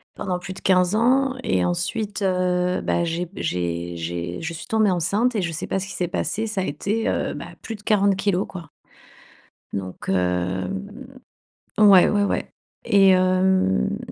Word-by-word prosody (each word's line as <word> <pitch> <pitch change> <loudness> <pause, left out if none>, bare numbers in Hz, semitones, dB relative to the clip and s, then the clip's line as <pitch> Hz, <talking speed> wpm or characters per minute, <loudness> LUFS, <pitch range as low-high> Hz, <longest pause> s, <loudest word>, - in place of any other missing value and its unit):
Pendant 180 -2 -2
plus 180 +1 -7
de - - -11
15 185 0 +3
ans 260 +4 +3
et 90 -1 +1
ensuite 205 - -2
heu, 180 -1 +1
bah, 170 - 0
j'ai 170 +1 -2
b - - -17
j'ai 85 - -2
j'ai 85 +1 -4
je 165 +1 -4
suis 160 - -9
tombée 215 -3 +2
enceinte 205 +8 +1
et 205 - +1
je 170 - -2
sais 165 - -4
pas - - -1
ce 195 - -5
qu'il - - -8
s'est 180 - -1
passé, 205 +4 -2
ça 215 -3 -2
a - - -1
été, 200 +10 -2
heu, - - -1
bah, - - -7 0.2
plus 225 - -5
de 210 - -14
40 200 -2 +3
kilogrammes, 195 -1 0 0.2
quoi. - - -24 1.0
Donc 95 -2 -5
hem. 95 - -2 0.6
Ouais, 200 -4 +7
ouais, 205 -1 +2
ouais. - - -2 0.3
Et 200 -4 +5
hem 185 - +2
185 Hz, 180 wpm, -23 LUFS, 155-205 Hz, 1.0 s, Ouais